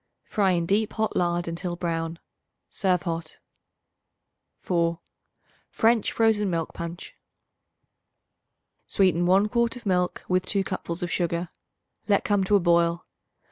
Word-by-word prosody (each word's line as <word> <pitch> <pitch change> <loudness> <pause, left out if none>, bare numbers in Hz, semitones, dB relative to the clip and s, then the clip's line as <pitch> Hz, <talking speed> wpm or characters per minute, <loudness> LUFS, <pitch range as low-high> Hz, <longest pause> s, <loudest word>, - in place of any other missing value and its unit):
Fry 200 -3 +1
in 170 -1 0
deep 205 +4 +1
hot 220 0 -1
lard 175 -1 0
until 175 +1 -3
brown. 165 -1 -3 0.5
Serve 185 -3 +1
hot. 165 -2 -4 1.2
4. 170 -1 0 0.7
French 225 0 +2
Frozen 220 -3 +2
Milk 165 -2 -2
Punch. 170 +1 -7 1.7
Sweeten 175 -3 +2
1 195 +3 +4
quart 235 +2 +1
of 245 - -11
milk 180 -2 0
with 185 0 +1
2 200 -2 +1
cupfuls 170 -2 -4
of 175 - -3
sugar; 170 0 -1 0.6
let 205 -2 +3
come 205 -2 +2
to 205 - +3
a - - +6
boil. 170 -1 +2
180 Hz, 130 wpm, -26 LUFS, 170-200 Hz, 1.7 s, a